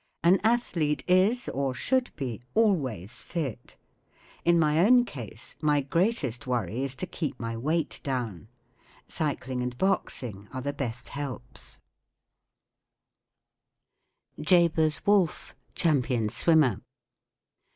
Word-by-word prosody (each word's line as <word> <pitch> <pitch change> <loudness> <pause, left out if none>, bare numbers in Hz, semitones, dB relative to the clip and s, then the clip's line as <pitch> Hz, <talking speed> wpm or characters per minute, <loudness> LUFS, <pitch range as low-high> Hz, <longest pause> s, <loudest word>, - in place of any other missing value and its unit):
An 180 +3 +5
athlete 180 -10 +1
is, 190 +7 +3
or 135 -1 -1
should 255 - +1
be, 125 -6 -4
always 135 - +1
fit. 150 -9 -5 0.7
In 170 0 +4
my 155 -1 +3
own 245 +3 +6
case 115 - -7
my 150 -2 +3
greatest 145 - 0
worry 120 -1 -1
is 135 -1 -2
to 185 - -2
keep 155 -7 -4
my 115 0 -3
weight 155 +8 -1
down* 120 - -3 0.6
Cycling 130 -4 -2
and 125 0 -3
boxing 120 - -1
are 130 - -4
the 145 +1 -2
best 120 -4 -4
helps* 130 -3 -7 2.6
JABEZ 160 -2 +3
WOLFFE. 200 -5 +2 0.2
Champion 125 -9 +1
Swimmer. 155 +2 +3
145 Hz, 110 wpm, -28 LUFS, 125-170 Hz, 2.6 s, own